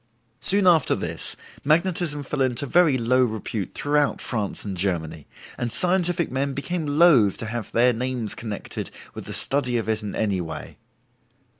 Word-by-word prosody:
Soon 200 Hz, 0 st, +6 dB
after 170 Hz, -5 st, +4 dB
this, -, -, -3 dB, 0.3 s
magnetism 160 Hz, -1 st, +1 dB
fell 140 Hz, +1 st, -3 dB
into 130 Hz, +1 st, 0 dB
very 160 Hz, -2 st, +3 dB
low 125 Hz, +2 st, +2 dB
repute 110 Hz, -4 st, -4 dB
throughout 145 Hz, 0 st, +1 dB
France 110 Hz, -5 st, -3 dB
and 100 Hz, -2 st, -4 dB
Germany, 80 Hz, -5 st, -3 dB, 0.3 s
and 120 Hz, -1 st, -2 dB
scientific 175 Hz, -, +2 dB
men 135 Hz, +1 st, -1 dB
became 160 Hz, +2 st, -3 dB
loath 145 Hz, -, +4 dB
to -, -, -6 dB
have 115 Hz, 0 st, -5 dB
their 125 Hz, +1 st, +3 dB
names 125 Hz, -2 st, -3 dB
connected 110 Hz, -3 st, -6 dB, 0.2 s
with -, -, -8 dB
the -, -, -8 dB
study 125 Hz, -3 st, 0 dB
of 115 Hz, -, -3 dB
it 110 Hz, -1 st, -1 dB
in 105 Hz, -2 st, -6 dB
any 100 Hz, -4 st, 0 dB
way. 80 Hz, -2 st, -7 dB
125 Hz, 160 wpm, -24 LUFS, 110-150 Hz, 0.3 s, Soon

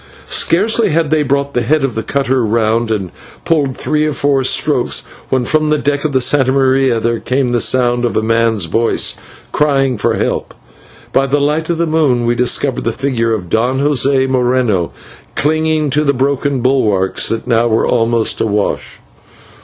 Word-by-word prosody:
Scarcely 215 Hz, +5 st, +1 dB
had 160 Hz, -1 st, 0 dB
they 155 Hz, -1 st, +2 dB
brought 140 Hz, 0 st, -1 dB
the 120 Hz, -, 0 dB
head 145 Hz, +5 st, +1 dB
of 135 Hz, -3 st, -1 dB
the 110 Hz, -, -3 dB
cutter 130 Hz, +1 st, 0 dB
round 115 Hz, +1 st, 0 dB
and 100 Hz, -6 st, -2 dB, 0.3 s
pulled 145 Hz, -6 st, 0 dB
three 150 Hz, 0 st, -1 dB
or 150 Hz, -, -2 dB
four 140 Hz, -1 st, +1 dB
strokes, 130 Hz, -, 0 dB, 0.3 s
when 130 Hz, -2 st, 0 dB
from 155 Hz, +2 st, +1 dB
the 150 Hz, -, +2 dB
deck 145 Hz, -1 st, -1 dB
of 155 Hz, -, -1 dB
the 135 Hz, -, +1 dB
/Santa 130 Hz, +1 st, +2 dB
Maria/ 130 Hz, -2 st, +2 dB
there 115 Hz, 0 st, -1 dB
came 130 Hz, 0 st, -1 dB
the 120 Hz, -1 st, 0 dB
sound 120 Hz, -1 st, +1 dB
of 120 Hz, -, -1 dB
a 110 Hz, -, 0 dB
man's 115 Hz, -3 st, +1 dB
voice 115 Hz, +8 st, 0 dB, 0.4 s
crying 135 Hz, -5 st, +1 dB
for -, -, 0 dB
help, -, -, -3 dB, 0.5 s
and -, -, -27 dB
by 135 Hz, 0 st, +2 dB
the 145 Hz, +2 st, +1 dB
light 150 Hz, +3 st, -1 dB
of 170 Hz, -, 0 dB
the 170 Hz, -, +1 dB
moon 150 Hz, -7 st, +1 dB
we 120 Hz, -, +2 dB
discovered 125 Hz, +2 st, 0 dB
the 115 Hz, -, 0 dB
figure 120 Hz, -2 st, -1 dB
of 100 Hz, -6 st, -3 dB
Don 120 Hz, +8 st, 0 dB
José 140 Hz, -1 st, +2 dB
Moreno 125 Hz, -8 st, 0 dB, 0.4 s
clinging 155 Hz, 0 st, 0 dB
to 150 Hz, +2 st, +1 dB
the 140 Hz, -2 st, +2 dB
broken 140 Hz, 0 st, -1 dB
bulwarks, 105 Hz, -8 st, +1 dB
that 115 Hz, -, -3 dB
now 120 Hz, -1 st, +2 dB
were 110 Hz, -1 st, +1 dB
almost 115 Hz, -1 st, 0 dB
awash. 105 Hz, -2 st, -2 dB
130 Hz, 185 wpm, -14 LUFS, 115-145 Hz, 0.5 s, they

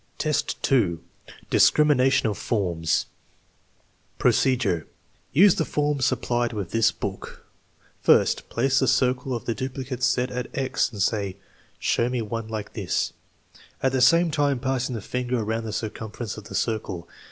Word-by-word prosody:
IV, 155 Hz, -2 st, -1 dB
2. 100 Hz, -11 st, +2 dB, 0.5 s
Discrimination 135 Hz, -5 st, +4 dB
of 105 Hz, -, -1 dB
forms 90 Hz, -7 st, 0 dB, 1.1 s
Procedure. 125 Hz, -11 st, +2 dB, 0.4 s
Use 185 Hz, +6 st, +6 dB
the -, -, 0 dB
forms 145 Hz, -4 st, 0 dB
supplied 120 Hz, -1 st, 0 dB
with 100 Hz, -5 st, -4 dB
this 115 Hz, -1 st, +3 dB
book. -, -, -7 dB, 0.6 s
First, -, -, +3 dB
place 135 Hz, +3 st, +2 dB
the 130 Hz, -, +1 dB
circle 125 Hz, +1 st, +1 dB
of 115 Hz, -, -6 dB
the 115 Hz, -, 0 dB
duplicate 130 Hz, 0 st, -5 dB
set 125 Hz, 0 st, +1 dB
at 125 Hz, 0 st, -3 dB
"X," 135 Hz, -2 st, 0 dB
and 105 Hz, -4 st, -1 dB
say: 100 Hz, -3 st, -1 dB, 0.2 s
" -, -, -33 dB
Show 120 Hz, -, +1 dB
me 125 Hz, -2 st, -1 dB
one 115 Hz, +1 st, -4 dB
like 110 Hz, -2 st, -5 dB
this," -, -, -1 dB, 0.7 s
at 130 Hz, -, +3 dB
the 130 Hz, -1 st, 0 dB
same 170 Hz, +6 st, +5 dB
time 145 Hz, -2 st, +1 dB
passing 130 Hz, -1 st, -1 dB
the 110 Hz, -, -4 dB
finger 125 Hz, +2 st, -2 dB
around 110 Hz, +1 st, -2 dB
the 110 Hz, -, -4 dB
circumference 110 Hz, 0 st, -5 dB
of 105 Hz, -, -10 dB
the -, -, -8 dB
circle. 100 Hz, -7 st, -2 dB
120 Hz, 150 wpm, -25 LUFS, 110-130 Hz, 1.1 s, Use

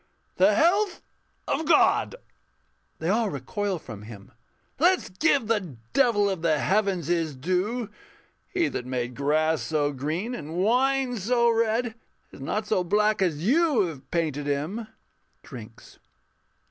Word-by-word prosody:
_] -, -, -40 dB
The -, -, +5 dB
health 360 Hz, +4 st, +2 dB, 0.4 s
of 320 Hz, -, -1 dB
God! 340 Hz, -, +4 dB, 0.8 s
[They 165 Hz, -, -3 dB
all 220 Hz, +1 st, +2 dB
recoil 205 Hz, -1 st, -3 dB
from 110 Hz, -9 st, -10 dB
him.] 105 Hz, -2 st, -12 dB, 0.5 s
Let's 360 Hz, +4 st, +3 dB
give 270 Hz, -, +2 dB
the 200 Hz, -, -2 dB, 0.2 s
Devil 235 Hz, -7 st, +3 dB
of 190 Hz, -4 st, -2 dB
the 160 Hz, -2 st, +2 dB
Heavens 195 Hz, -1 st, +1 dB
His 165 Hz, -3 st, -1 dB
due! 190 Hz, -, -1 dB, 0.6 s
He 355 Hz, -4 st, +1 dB
that 125 Hz, -, -5 dB
made 125 Hz, -1 st, -3 dB
grass 155 Hz, +4 st, +1 dB
so 150 Hz, -2 st, 0 dB
green, 160 Hz, -, -3 dB
and 155 Hz, -6 st, -6 dB
wine 250 Hz, +6 st, +2 dB
so 235 Hz, +3 st, +2 dB
red, 230 Hz, +1 st, +1 dB, 0.4 s
Is -, -, -13 dB
not 210 Hz, +10 st, -2 dB
so 200 Hz, -4 st, +1 dB
black 210 Hz, +3 st, +2 dB
as 165 Hz, -3 st, 0 dB
you 295 Hz, 0 st, +3 dB
have 145 Hz, -5 st, -11 dB
painted 150 Hz, -4 st, -1 dB
him. 160 Hz, +11 st, -2 dB, 0.6 s
[_Drinks. -, -, -12 dB
195 Hz, 140 wpm, -26 LUFS, 155-235 Hz, 0.8 s, The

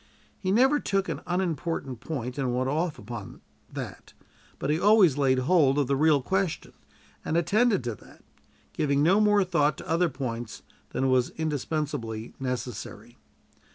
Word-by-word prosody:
He 185 Hz, -, -3 dB
never 265 Hz, +7 st, +4 dB
took 195 Hz, -5 st, -1 dB
an -, -, -4 dB
unimportant 165 Hz, -7 st, -2 dB
point 125 Hz, -1 st, -5 dB
and 125 Hz, -3 st, 0 dB
went 130 Hz, +1 st, 0 dB
off 160 Hz, +1 st, -1 dB
upon 115 Hz, +3 st, -8 dB, 0.3 s
that; -, -, -8 dB, 0.4 s
but 140 Hz, -, -1 dB
he 155 Hz, -, +1 dB
always 200 Hz, -7 st, +5 dB
laid 135 Hz, -2 st, +2 dB
hold 140 Hz, 0 st, +3 dB
of 145 Hz, -, +2 dB
the 140 Hz, +2 st, 0 dB
real 145 Hz, -1 st, +3 dB
question, 190 Hz, 0 st, -1 dB, 0.5 s
and 160 Hz, -, 0 dB
attended 210 Hz, -, +2 dB
to 120 Hz, -1 st, -2 dB
that, -, -, -17 dB, 0.5 s
giving 140 Hz, -1 st, +1 dB
no 190 Hz, +6 st, +4 dB
more 210 Hz, -1 st, +4 dB
thought 155 Hz, -5 st, +1 dB
to -, -, -10 dB
other 170 Hz, +2 st, +2 dB
points 120 Hz, -5 st, -5 dB, 0.3 s
than 130 Hz, 0 st, 0 dB
was 130 Hz, -1 st, +3 dB
indispensably 145 Hz, -7 st, -3 dB
necessary. 125 Hz, -4 st, -5 dB
150 Hz, 155 wpm, -27 LUFS, 130-180 Hz, 0.5 s, always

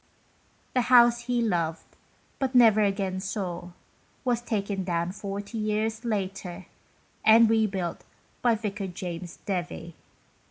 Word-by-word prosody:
The 255 Hz, -, +3 dB
house 240 Hz, -1 st, +6 dB
he 245 Hz, -1 st, +1 dB
loved, 165 Hz, -6 st, -1 dB, 0.5 s
but 265 Hz, -1 st, -1 dB
never 225 Hz, -3 st, +7 dB
again 195 Hz, -2 st, 0 dB
saw, 185 Hz, -3 st, -4 dB, 0.6 s
was 240 Hz, -2 st, +1 dB
taken 200 Hz, -4 st, -2 dB
down 170 Hz, -1 st, -1 dB
40 200 Hz, +3 st, -5 dB
years 215 Hz, +2 st, -1 dB
later, 195 Hz, -4 st, -3 dB, 0.6 s
and 225 Hz, +1 st, +7 dB
re 220 Hz, 0 st, +3 dB
built 185 Hz, -4 st, -4 dB, 0.4 s
by 240 Hz, -2 st, +4 dB
Vicar 205 Hz, -2 st, -4 dB
James 175 Hz, -1 st, -6 dB
Devie. 175 Hz, -3 st, -4 dB
200 Hz, 120 wpm, -27 LUFS, 185-225 Hz, 0.6 s, never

